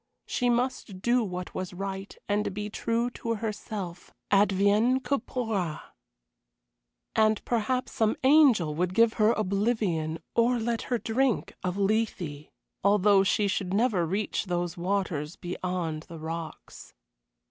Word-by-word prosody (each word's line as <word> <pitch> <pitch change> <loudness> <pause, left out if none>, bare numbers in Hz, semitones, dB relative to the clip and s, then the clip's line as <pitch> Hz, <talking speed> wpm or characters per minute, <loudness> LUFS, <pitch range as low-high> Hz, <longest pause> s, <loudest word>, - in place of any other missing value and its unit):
She 245 -1 0
must 240 -5 -1
do 240 0 +3
what 180 -3 -5
was 185 -1 -5
right, 195 +1 -5
and 205 -1 0
be 210 0 -4
true 235 +3 -1
to 230 -1 -3
herself, 205 -4 -5 0.2
advienne 205 +5 +4
que 275 +2 +1
pourra. 215 -10 -2 1.4
And 215 -1 +3
perhaps 245 +2 0
some 220 -1 +1
angel 260 - +5
would 180 +4 -1
give 230 0 +5
her 215 +1 +6
oblivion 200 -6 0 0.2
or 235 +1 +3
let 230 0 -1
her 245 - +2
drink 240 +2 0
of 180 0 -2
Lethe, 195 -8 -1 0.3
though 200 0 +5
she 205 +1 +2
should 190 -1 -1
never 215 -5 +2
reach 195 +7 -1
those 175 -2 -2
waters 175 -4 -2
beyond 175 -3 -4
the 170 - -8
rocks. 160 0 -7
205 Hz, 130 wpm, -28 LUFS, 180-230 Hz, 1.4 s, her